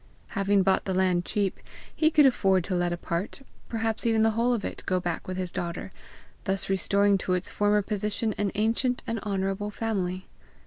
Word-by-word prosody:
Having 195 Hz, 0 st, +2 dB
bought 190 Hz, 0 st, +2 dB
the 190 Hz, -, -1 dB
land 180 Hz, -2 st, +2 dB
cheap, 200 Hz, -3 st, -1 dB, 0.4 s
he 315 Hz, -, +4 dB
could 300 Hz, -2 st, +5 dB
afford 195 Hz, -8 st, +3 dB
to 185 Hz, -, -3 dB
let 175 Hz, -1 st, +1 dB
a 175 Hz, -, -2 dB
part, 175 Hz, +10 st, -4 dB, 0.3 s
perhaps 225 Hz, -1 st, -1 dB
even 225 Hz, -1 st, +3 dB
the 225 Hz, -, +4 dB
whole 230 Hz, +3 st, +1 dB
of 230 Hz, -4 st, -1 dB
it, -, -, -5 dB
go 185 Hz, -1 st, +2 dB
back 175 Hz, -2 st, -3 dB
with 185 Hz, 0 st, -4 dB
his 185 Hz, -1 st, -3 dB
daughter, 175 Hz, +2 st, -4 dB, 0.5 s
thus 195 Hz, 0 st, 0 dB
restoring 200 Hz, +1 st, +3 dB
to 185 Hz, 0 st, 0 dB
its 180 Hz, -, -2 dB
former 205 Hz, 0 st, +2 dB
position 210 Hz, +2 st, -1 dB
an 205 Hz, -2 st, +1 dB
ancient 230 Hz, +4 st, +1 dB
and 230 Hz, -1 st, -2 dB
honourable 195 Hz, 0 st, -2 dB
family. 190 Hz, -4 st, -2 dB
200 Hz, 190 wpm, -27 LUFS, 185-220 Hz, 0.5 s, could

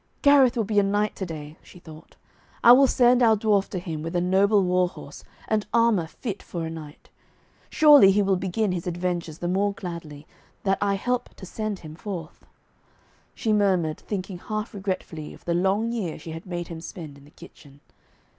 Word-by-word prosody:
'Gareth 275 Hz, -3 st, +5 dB
will 225 Hz, -, +2 dB
be 205 Hz, 0 st, +1 dB
a -, -, +5 dB
knight 205 Hz, +1 st, 0 dB
to 190 Hz, -, -4 dB
day,' 155 Hz, -1 st, -8 dB
she -, -, -16 dB
thought. 160 Hz, -2 st, -14 dB, 0.5 s
'I 235 Hz, -, +9 dB
will 270 Hz, +2 st, +7 dB
send 245 Hz, 0 st, +4 dB
our 225 Hz, -2 st, +5 dB
dwarf 205 Hz, -2 st, +1 dB
to 190 Hz, -, -4 dB
him 165 Hz, -4 st, -5 dB
with 165 Hz, +3 st, -5 dB
a -, -, +3 dB
noble 195 Hz, +3 st, +3 dB
war 180 Hz, 0 st, +2 dB
horse -, -, -12 dB, 0.2 s
and 215 Hz, -1 st, 0 dB
armour 230 Hz, -8 st, +3 dB
fit 205 Hz, +4 st, -6 dB
for 170 Hz, -2 st, -5 dB
a 160 Hz, -, -5 dB
knight. 155 Hz, -2 st, -11 dB, 0.6 s
Surely 295 Hz, -10 st, +7 dB
he 205 Hz, +1 st, +3 dB
will 195 Hz, -1 st, +2 dB
begin 190 Hz, +3 st, -1 dB
his 180 Hz, -1 st, -4 dB
adventures 175 Hz, -2 st, -3 dB
the 175 Hz, -, -4 dB
more 200 Hz, +3 st, +1 dB
gladly, 165 Hz, -6 st, -8 dB, 0.4 s
that 195 Hz, -1 st, +1 dB
I 200 Hz, -1 st, +1 dB
help 245 Hz, +5 st, -3 dB
to 190 Hz, -, -11 dB
send 215 Hz, +2 st, -4 dB
him 155 Hz, -2 st, -10 dB
forth,' 175 Hz, -2 st, -8 dB, 0.9 s
she 220 Hz, -3 st, 0 dB
murmured, 185 Hz, -7 st, +1 dB
thinking 190 Hz, -3 st, -5 dB
half 215 Hz, +3 st, -5 dB
regretfully 185 Hz, -6 st, -5 dB
of -, -, -20 dB
the 170 Hz, -, 0 dB
long 195 Hz, +6 st, +1 dB
year 200 Hz, -9 st, -3 dB
she 165 Hz, -, -9 dB
had 165 Hz, +3 st, -9 dB
made 175 Hz, -1 st, -5 dB
him 165 Hz, -1 st, -7 dB
spend 165 Hz, -5 st, -9 dB
in 140 Hz, -, -17 dB
the -, -, -17 dB
kitchen. 140 Hz, -2 st, -16 dB
190 Hz, 195 wpm, -25 LUFS, 170-210 Hz, 0.9 s, I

